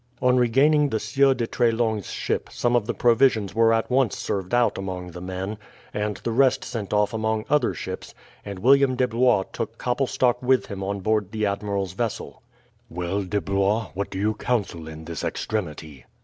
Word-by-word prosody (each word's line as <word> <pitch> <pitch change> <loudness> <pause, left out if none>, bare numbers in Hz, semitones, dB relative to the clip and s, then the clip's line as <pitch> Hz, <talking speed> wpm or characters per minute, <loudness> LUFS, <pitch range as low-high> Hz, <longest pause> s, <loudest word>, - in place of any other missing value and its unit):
On 125 0 +3
regaining 140 +5 +4
the 110 - -1
Sieur 135 +5 +3
de 120 - -1
Treslong's 115 -4 0
ship - - -2
some 120 0 0
of 115 -3 +1
the - - -1
provisions 115 -4 +3
were 115 0 +4
at 115 +2 0
once 130 -4 +2
served 95 -2 -3
out 120 -5 +2
among 90 -2 -5
the 90 +1 -9
men, 95 +3 -5 0.3
and 105 0 -2
the 115 - -1
rest 130 +3 +3
sent 105 -5 -5
off 105 +1 +2
among 110 0 -1
other 150 -5 +2
ships, - - -7 0.3
and 100 -2 -6
William 135 +5 +4
de 125 0 +2
Blois 120 -3 +3
took - - -4
Koppelstok 125 -1 0
with 130 0 +2
him 95 -1 -6
on 100 0 -3
board 105 -1 0
the 110 -1 -1
admiral's 100 -2 -2
vessel. 115 +3 -4 0.5
"Well, 90 +4 -2
De 100 +2 -1
Blois, 100 +3 0
what 100 +2 -3
do 95 - -6
you 105 +3 +1
counsel 105 -8 -2
in 80 0 -9
this 85 -1 -5
extremity?" 80 - -4
110 Hz, 185 wpm, -24 LUFS, 95-120 Hz, 0.5 s, regaining